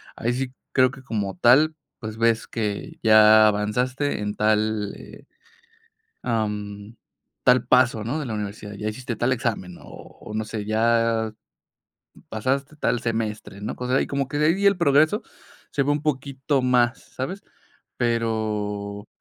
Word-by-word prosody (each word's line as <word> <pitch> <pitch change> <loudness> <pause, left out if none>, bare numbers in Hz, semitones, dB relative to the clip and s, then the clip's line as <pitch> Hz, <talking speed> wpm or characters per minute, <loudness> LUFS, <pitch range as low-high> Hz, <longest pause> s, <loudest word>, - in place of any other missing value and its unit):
ahí 120 +2 -1
sí 130 0 -3 0.2
creo 130 -1 +4
que 135 0 -13
como 105 -5 -3
tal, 150 +6 +5 0.2
pues, 110 -2 -6
ves 115 0 +2
que 105 -3 -4
ya 110 -1 +7
avanzaste 125 +7 0
en 105 0 -3
tal, 105 -1 +1
eh, - - -13 1.0
am, 105 -2 -3 0.5
tal 125 -1 +4
paso, 125 -4 +3
¿no?, 135 +7 -2
de 150 - -4
la 115 - -3
universidad. 105 0 -6
Ya 105 +2 -4
hiciste 120 +2 -5
tal 120 +3 +2
examen, 110 -7 -3
o - - -15 0.4
o 105 - -9
no 110 0 -1
sé, 110 -1 -5
ya 115 0 +1 1.0
pasaste 135 +6 -2
tal 120 -4 0
semestre, 110 -3 -3
¿no? 105 - -4
O 125 - -5
sea, 130 - +2
ahí - - +2
como 140 -1 -1
que 145 - -3
de 150 - +3
ahí 190 +5 +2
el 200 -1 +5
progreso 155 - +3 0.5
se 140 - +1
ve 145 - 0
un 145 0 -1
poquito 140 -1 -1
más, 125 -1 +3
¿sabes? 185 +10 -6 0.6
Pero, 105 -3 -2
115 Hz, 155 wpm, -24 LUFS, 105-130 Hz, 1.0 s, ya